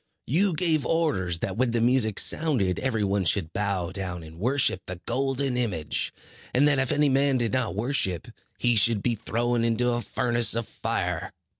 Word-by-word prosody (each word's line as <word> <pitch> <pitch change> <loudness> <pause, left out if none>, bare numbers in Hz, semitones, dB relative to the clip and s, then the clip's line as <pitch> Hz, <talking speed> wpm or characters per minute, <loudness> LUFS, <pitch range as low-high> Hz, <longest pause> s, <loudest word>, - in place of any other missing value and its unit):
You 180 - +2
gave 155 -3 +2
orders 120 - 0
that 95 - -3
when 130 0 +2
the 115 0 0
music 115 -3 +2
sounded, 125 - +1
every 115 -5 -1
one 100 0 0
should 85 -2 0
bow 100 -4 -2
down 90 -3 -4
and 80 +1 -12
worship 125 -3 +2
the 90 - -5
golden 135 +1 -1
image; 95 -12 -1 0.4
and 140 +4 +5
that 140 -2 +3
if 130 -2 0
any 145 0 +3
man 135 0 +2
did 115 -4 -1
not 120 -6 -1
worship, 110 -6 0 0.3
he 120 -1 +2
should 110 -1 +3
be 120 - +1
thrown 115 +2 -1
into 115 +1 +1
a 120 0 -1
furnace 120 -1 +1
of 115 -2 -2
fire. - - -3
120 Hz, 180 wpm, -26 LUFS, 100-135 Hz, 0.4 s, and